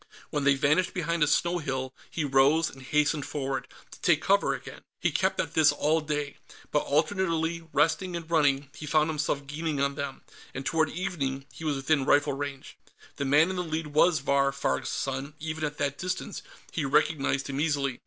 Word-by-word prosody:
When 145 -2 -1
they 140 0 +5
vanished 150 +6 +2
behind 170 -2 -1
a 150 - +5
snow 175 +4 +2
hill, 130 -4 -3 0.2
he 155 - -2
rose 140 +4 +4
and 135 - -13
hastened 150 +2 +1
forward, 135 -2 -3 0.2
to - - -13
take - - +4
cover - - +2
again. - - -10 0.2
He - - +1
kept - - 0
at - - -1
this 155 -2 +5
all 155 +2 +1
day; 150 -1 -3 0.3
by 150 - +3
alternately 165 +1 0
resting 165 +5 +1
and 170 -2 -5
running, 145 -4 +2
be 150 - -6
found 155 +1 +3
himself 145 -2 -1
gaining 150 +1 -3
on 140 0 +1
them, 140 -1 -5 0.3
and 135 +1 -5
toward 160 -2 +2
evening, 145 -7 -3
he 125 - -10
was 150 -2 0
within 135 +1 +1
rifle 145 +1 +3
range. 140 -1 -6 0.4
The 140 - -2
man 150 +6 +4
in 185 - -4
the 180 - 0
lead 160 -2 -4
was 155 -1 +4
Vahr 140 0 +2
Farg's 140 - -1
son; 135 +2 -3
even 160 0 -4
at 150 -1 -2
that 140 -1 -2
distance 185 +1 -3 0.3
he 160 - -2
recognized 140 -1 +1
him 140 0 -3
easily. 140 -5 0
150 Hz, 195 wpm, -28 LUFS, 140-160 Hz, 0.4 s, they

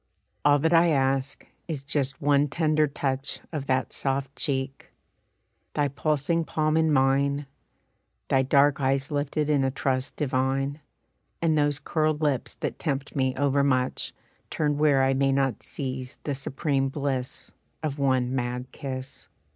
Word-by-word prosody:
"All 145 0 +5
that 160 +4 +1
I 170 +1 +6
ask, 135 -3 0 0.2
is 150 -5 -4
just 140 -2 -1
one 145 0 +4
tender 155 0 +2
touch 135 -1 -1
Of 145 -4 -4
that 130 0 0
soft 135 0 -2
cheek. 135 -2 -2 0.9
Thy 145 -1 +2
pulsing 155 +4 0
palm 155 -1 0
in 160 -1 +3
mine, 140 +1 +2 0.8
Thy 135 - +3
dark 140 +2 +3
eyes 135 +2 +1
lifted 145 +1 -1
in 145 -3 +2
a 135 - +2
trust 130 0 -2
divine 135 +1 0 0.6
And 165 -2 +2
those 145 -2 +2
curled 155 +1 0
lips 145 -5 0
that - - -4
tempt 140 -3 -3
me 130 -2 +1
overmuch 140 -2 +1 0.4
Turned 150 -2 0
where 145 -3 +4
I 135 0 +3
may 135 0 +2
not 135 -3 0
seize 130 -2 -5
the 145 - -2
supreme 135 0 -1
bliss 135 -2 -3 0.3
Of 145 -2 -2
one 130 -2 +1
mad 125 0 -3
kiss. 130 -1 -7
140 Hz, 145 wpm, -26 LUFS, 135-150 Hz, 0.9 s, I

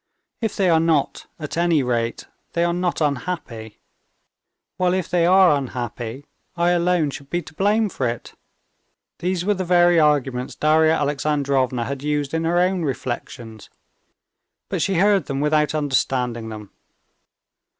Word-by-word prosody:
"If 225 -3 -2
they 195 - +1
are 165 -2 +4
not, 160 -3 0
at 150 -2 -6
any 170 -4 +2
rate 120 -2 -2 0.3
they 170 - +1
are 170 0 +1
not 175 -1 -1
unhappy; 140 -7 -3 1.0
while 180 0 +2
if 185 -3 -2
they 175 -1 +2
are 185 -3 +6
unhappy, 125 -1 -5 0.3
I 170 +1 +2
alone 175 -3 +1
should 140 0 -10
be 175 0 -2
to 155 - -13
blame 210 +5 +2
for 135 -9 -2
it." 115 0 -5 0.9
These 180 0 -1
were 210 - +3
the 190 -1 -3
very 175 -1 +4
arguments 135 -4 +1
Darya 155 +1 +3
Alexandrovna 140 -4 0
had 140 +1 -5
used 145 -1 -2
in 165 0 -1
her 170 +1 +1
own 180 +1 +2
reflections; 120 -5 -5 1.0
but - - -2
she 195 - 0
heard 195 -1 +3
them 135 0 -3
without 150 +1 +1
understanding 125 -5 -1
them. 105 -2 -9
150 Hz, 150 wpm, -22 LUFS, 130-175 Hz, 1.0 s, are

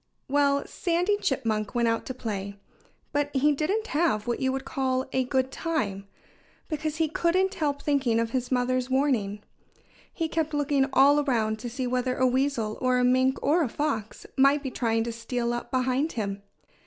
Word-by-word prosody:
Well, 280 0 +2
Sandy 360 +3 0
Chipmunk 225 - -1
went 235 -1 +2
out 230 0 0
to 260 - -4
play. 200 -5 -4 0.6
But 290 0 0
he 290 +3 +4
didn't 360 +10 0
have 295 - +1
what 240 - -1
you 260 -1 +1
would 270 0 -4
call 260 -1 -1
a 260 - +2
good 260 +1 0
time, 205 -14 -2 0.6
because 310 -1 -3
he 320 0 +1
couldn't 365 +5 +1
help 290 -5 -2
thinking 270 -6 +2
of 230 0 -1
his 255 0 -2
mother's 255 0 +1
warning. 240 -7 0 0.7
He 330 - -2
kept 315 -1 -1
looking 285 -1 +1
all 280 +2 +5
around 225 -6 0
to 240 - -5
see 255 +2 -3
whether 255 +1 0
a 260 - +3
weasel 255 -4 0
or 255 0 +2
a 250 - +2
mink 260 +1 +3
or 325 +5 +3
a 285 - 0
fox 230 -7 -3
might 275 +2 +4
be 265 - -3
trying 225 -2 0
to 235 - -3
steal 235 +1 -2
up 240 - -4
behind 260 +4 0
him. 200 -3 -3
260 Hz, 180 wpm, -27 LUFS, 235-290 Hz, 0.7 s, all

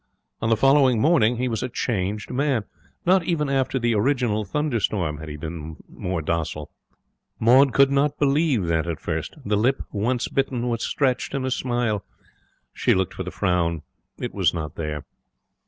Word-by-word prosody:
On 110 - 0
the 115 - +3
following 135 -1 +4
morning 125 -5 +3
he 125 +1 0
was 115 -3 -2
a 130 - -2
changed 105 -4 -2
man. 130 -3 +1 0.4
Not 185 +1 +4
even 155 -5 0
after 135 -1 +1
the 120 -2 +1
original 110 -1 +1
thunderstorm 105 - -1
had 80 0 -7
he 75 - -6
been 80 0 -6
more 90 -3 -4
docile. 75 -2 -3 0.7
Maud 130 +4 +6
could 140 +1 +4
not 140 +1 +1
believe 140 - +2
that 85 -1 -1
first. 80 -2 -4
The 105 0 +1
lip, 125 +6 +1
once 120 +4 0
bitten, 130 -3 -1
was 115 -1 -2
stretched 130 -1 0
in 135 -1 -1
a 130 - -1
smile. 120 -5 -1 0.7
She - - +2
looked 95 -2 0
for - - -6
the - - -4
frown. 85 -3 0 0.3
It - - -5
was - - +1
not 80 -2 -4
there. 75 -2 -4
115 Hz, 170 wpm, -24 LUFS, 90-135 Hz, 0.7 s, Maud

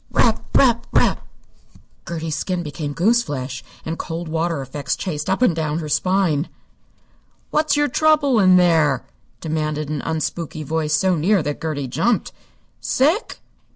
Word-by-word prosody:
"Rap - - +2
rap 235 -3 +3
rap!" - - +2 0.8
Gertie's 160 -2 -3
skin 180 +1 -2
became 150 -1 -5
goose 225 +10 +3
flesh, 130 - -5 0.2
and 160 +1 -4
coldwater 165 -1 -2
effects 140 +2 -3
chased 150 -3 -4
up 190 +6 +1
and 180 -10 +3
down 155 -1 -1
her 155 -2 -4
spine. 180 -2 +1 1.0
"What's 305 -1 +2
your 295 0 +3
trouble 290 -3 +3
in 185 -2 +6
there?" 160 -7 +3 0.4
demanded 155 -2 -2
an 150 -2 -2
unspooky 160 -1 -3
voice 155 0 0
so 185 +1 +2
near 180 +3 +2
that 145 0 -4
Gertie 150 -4 -3
jumped. 220 - 0 0.5
"Sick?" 315 - 0
165 Hz, 140 wpm, -21 LUFS, 150-195 Hz, 1.0 s, in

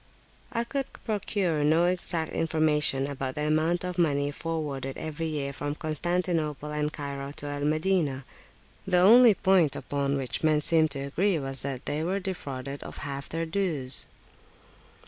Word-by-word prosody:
I 230 - -1
could 270 +3 -4
procure 195 -7 0
no 160 +3 +4
exact 175 -2 -1
information 150 -4 +2
about 135 -2 -4
the 150 - -2
amount 160 +3 +1
of 180 0 -4
money 145 -3 +1
forwarded 145 -4 -4
every 160 +1 -4
year 145 -3 -3
from 145 +1 -4
Constantinople 155 -1 -2
and 150 0 -1
Cairo 140 -2 -5
to 145 - -7
Al 145 0 -3
Madinah; 155 -4 0 0.6
the 180 -2 +3
only 225 +4 +7
point 185 -7 +3
upon 140 0 -2
which 130 -2 -3
men 155 -1 +3
seemed 160 +1 +4
to 140 -1 -3
agree 180 +6 +1
was 135 -2 0
that 135 -2 -4
they 150 +2 -2
were 190 +4 -1
defrauded 140 -8 -5
of - - -9
half 140 -1 -6
their 165 +1 -2
dues. 160 -7 +2
155 Hz, 155 wpm, -27 LUFS, 140-175 Hz, 0.6 s, only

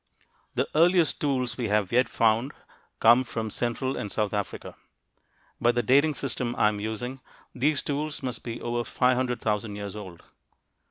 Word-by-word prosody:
The - - +1
earliest 170 +1 +4
tools 130 -4 -1
we 120 - 0
have 105 -2 +1
yet 125 +1 +3
found 115 +5 +2 0.5
come 120 +3 +6
from 110 -3 -4
central 130 +4 -2
and 100 - -4
south 105 -1 -1
Africa. 105 -1 -4 0.9
By 120 0 +4
the 120 0 0
dating 140 +6 +4
system 125 -3 -3
I'm 105 -1 +2
using, 110 +5 -4 0.3
these 140 +3 +1
tools 145 0 -3
must 125 -3 -4
be 115 -1 -5
over 120 0 -2
500,000 125 -5 0
years 100 0 -6
old. 95 -5 -9
120 Hz, 150 wpm, -27 LUFS, 110-130 Hz, 0.9 s, come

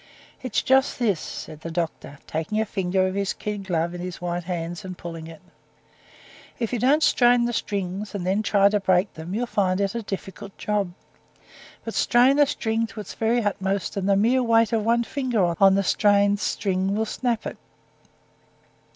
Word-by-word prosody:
"It's 255 -4 -1
just 265 +1 +3
this," 210 -9 +1
said 155 0 -8
the 165 - -6
doctor, 165 -3 -4
taking 160 +7 -2
a 220 - +1
finger 190 -2 0
of 185 - -1
his 200 0 -1
kid 205 -2 -5
glove 170 -1 0
in 175 - -6
his 180 -1 -6
white 175 -1 -3
hands 175 +1 -4
and 185 -1 -7
pulling 165 -2 -7
it, 165 +1 -12 1.1
"if 230 0 -3
you 245 - 0
don't 285 +7 +3
strain 245 -3 +4
the 240 - -1
strings, 200 -1 -3
and 185 -3 -3
then 195 +3 +1
try 200 -2 +4
to 210 0 +1
break 185 0 +2
them, 165 +4 -6
you'll 245 +3 0
find 190 -5 0
it 195 -1 0
a 235 - -3
difficult 195 -1 -7
job; 205 -3 -1 0.9
but 225 - -4
strain 255 +4 +4
a 290 - +6
string 225 -5 -1
to 220 - -10
its 210 - -7
very 230 +1 +1
utmost, 195 -1 -1
and 200 0 -1
the 200 - +5
mere 240 +6 +3
weight 230 -2 +3
of 220 -2 +1
one 235 +2 +2
finger 235 -10 0
on 195 -1 +7
the 195 - +2
strained 205 +1 +3
string 195 -1 -1
will 220 +1 0
snap 235 0 -2
it. - - -5
200 Hz, 190 wpm, -24 LUFS, 185-225 Hz, 1.1 s, on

